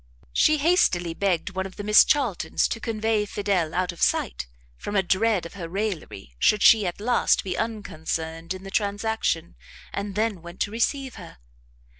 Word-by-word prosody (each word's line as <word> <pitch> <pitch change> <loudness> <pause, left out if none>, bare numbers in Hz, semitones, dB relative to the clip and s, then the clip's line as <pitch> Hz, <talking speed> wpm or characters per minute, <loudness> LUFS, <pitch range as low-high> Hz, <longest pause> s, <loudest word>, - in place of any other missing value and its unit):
She 310 0 +4
hastily 280 - +2
begged 190 +1 -1
one 190 0 -3
of 190 - -15
the 205 - -6
Miss 210 +1 +7
Charltons 255 -11 +1
to 230 - -3
convey 220 -2 0
Fidel 195 -6 -1
out 185 0 0
of 170 - -13
sight, - - 0 0.3
from 205 - -6
a 195 - +3
dread 190 +1 +1
of 170 - -9
her 175 -4 -7
raillery, 175 - -4
should 210 - +3
she, 215 -4 +6
at 175 - -4
last, 240 +4 +2
be 185 -2 -3
unconcerned 165 -6 -4
in 185 - -10
the 195 - -8
transaction, 205 -5 -1 0.4
and 200 -1 -4
then 215 -4 -1
went 175 +2 -11
to 205 - 0
receive 260 +3 -1
her. 170 - -12
200 Hz, 175 wpm, -25 LUFS, 175-220 Hz, 0.4 s, Miss